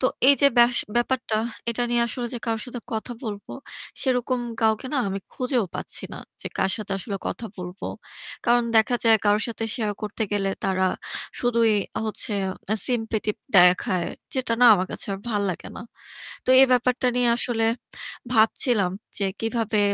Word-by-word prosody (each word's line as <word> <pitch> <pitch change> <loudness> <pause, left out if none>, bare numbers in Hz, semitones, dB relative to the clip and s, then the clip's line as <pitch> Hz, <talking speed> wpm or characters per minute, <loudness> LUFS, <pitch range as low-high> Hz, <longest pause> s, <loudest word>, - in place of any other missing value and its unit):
তো 255 - +3 0.2
এইযে 280 0 +6
বাস 240 0 +6 0.2
ব্যাপারটা 240 -2 0 0.3
এটা 240 +1 -1
নিয়ে 240 0 +3
আসলে 240 +1 -3
যে - - -3
কারো 225 -1 -1
সাথে 245 -1 -6
কথা 220 +3 -3
বলবো 205 -2 -6 0.5
সেরকম 255 -1 0 0.2
কাউকে 220 +2 +2
না - - +2
আমি 195 +1 -3
খুঁজেও 250 -3 0
পাচ্ছি - - -4
না, - - -8 0.2
যে - - -6
কার - - +2
সাথে 205 -2 -5
আসলে 200 +1 -4
কথা 230 - -5
বলবো। 180 +1 -6 0.6
কারণ 240 0 +4
দেখা 220 +3 +4
যায় 225 -1 +6
কারো 205 +1 +4
সাথে 225 -1 -4
শেয়ার 215 -4 -1
করতে 210 +1 -3
গেলে 195 -1 +1
তারা 190 -1 +1 0.6
শুধুই 235 -2 +3 0.3
হচ্ছে 215 0 -1 0.5
sympathy 225 -3 -1 0.3
দেখায়। 180 0 +4 0.3
যেটা 255 -3 0
না - - +7
আমার 185 -1 -1
কাছে - - -1
আর - - -7
ভাল্লাগেনা। 200 -4 -3 0.6
তো - - -13
এই 270 - +8
ব্যাপারটা 250 +1 +2
নিয়ে 245 -1 +3
আসলে 235 -2 0 0.7
ভাবছিলাম 220 -3 +3 0.3
যে 200 - +1 0.2
কিভাবে 225 -1 0
225 Hz, 155 wpm, -24 LUFS, 205-245 Hz, 0.7 s, এই